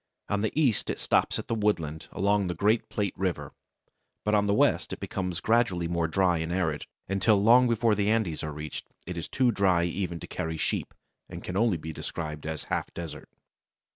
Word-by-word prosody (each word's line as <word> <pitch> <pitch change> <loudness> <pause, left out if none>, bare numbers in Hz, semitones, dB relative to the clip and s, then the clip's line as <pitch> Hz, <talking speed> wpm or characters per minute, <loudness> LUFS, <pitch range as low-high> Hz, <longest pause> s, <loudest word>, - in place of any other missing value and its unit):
On 100 0 +1
the 110 - 0
east 130 -9 +2
it - - -1
stops - - +1
at - - -6
the - - -1
woodlands 85 -8 -1
along 100 0 +1
the 90 - -2
great 105 +6 +2
Plate 100 -3 -1
River, 95 -2 -2 0.7
but 105 - +1
on 105 -1 +3
the 100 - +3
west - - +2
it - - -5
becomes 90 -2 -3
gradually 110 -7 +2
more 85 -1 0
dry 90 0 +2
and 80 +1 -3
arid, 80 -5 -1 0.2
until 100 +3 +3
long 120 +5 +6
before 115 -1 +3
the 105 0 +1
Andes 110 -9 0
are 75 - -3
reached 75 0 -6 0.2
it 90 - -5
is 85 -2 -4
too 125 -2 +3
dry 95 -5 +3
even 85 0 -2
to - - -7
carry 80 0 -4
sheep, - - -2 0.3
and - - -8
can 90 - -5
only 110 -3 +3
be 80 +1 -6
described 75 0 -5
as 80 -2 -4
a - - -17
half - - -1
desert. 85 -2 -7
95 Hz, 205 wpm, -28 LUFS, 80-105 Hz, 0.7 s, long